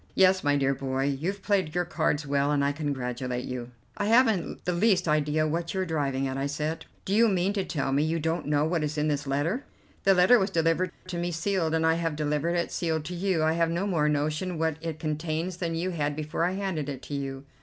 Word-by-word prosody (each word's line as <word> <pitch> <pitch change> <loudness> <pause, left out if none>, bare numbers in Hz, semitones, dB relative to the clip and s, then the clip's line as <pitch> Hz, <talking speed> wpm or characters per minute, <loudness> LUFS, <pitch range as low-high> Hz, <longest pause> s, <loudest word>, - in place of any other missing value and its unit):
Yes, 190 0 +5
my 145 -1 +3
dear 135 -1 +2
boy, 135 0 -2
you've 160 +9 -2
played 190 -6 +1
your 175 0 +1
cards 160 -3 0
well, 140 0 +1
and 140 -1 +2
I 140 - +2
congratulate 125 -4 -3
you." 125 -2 -5 0.3
"I 205 - -1
haven't 225 -5 +2
the 180 - +1
least 185 -1 +3
idea 150 0 +2
what 170 +3 -2
you 190 - +1
are - - 0
driving 140 -5 -1
at," 130 0 -3
I 135 +1 -1
said. 150 +3 -3 0.2
"Do 195 - -1
you 230 +2 +5
mean 190 -1 +1
to 200 -2 0
tell 140 -6 -2
me 140 +2 +2
you 160 +2 0
don't 165 +1 -1
know 150 0 +2
what 160 -1 0
is 150 0 -2
in 150 +1 +1
this 145 -1 -1
letter?" 155 - 0 0.4
"The 195 0 +5
letter 185 +7 +6
was 195 0 +1
delivered 165 +1 +1 0.2
to 175 -2 -4
me 175 0 -1
sealed, 170 -1 0
and 160 0 +1
I 160 - +5
have 165 -2 -1
delivered 150 +3 0
it 170 - -1
sealed 160 -3 -1
to 175 - -5
you. 180 -2 0
I 160 0 +3
have 165 0 +2
no 170 +4 -1
more 160 -7 +2
notion 155 +4 -1
what 160 -1 0
it 165 -2 -4
contains 160 +2 -2
than 170 -2 -2
you 180 +3 -1
had 145 -4 -1
before 155 +2 -1
I 180 - 0
handed 190 -7 -2
it 135 -2 -6
to - - -7
you." 135 -1 -4
160 Hz, 240 wpm, -27 LUFS, 145-180 Hz, 0.4 s, letter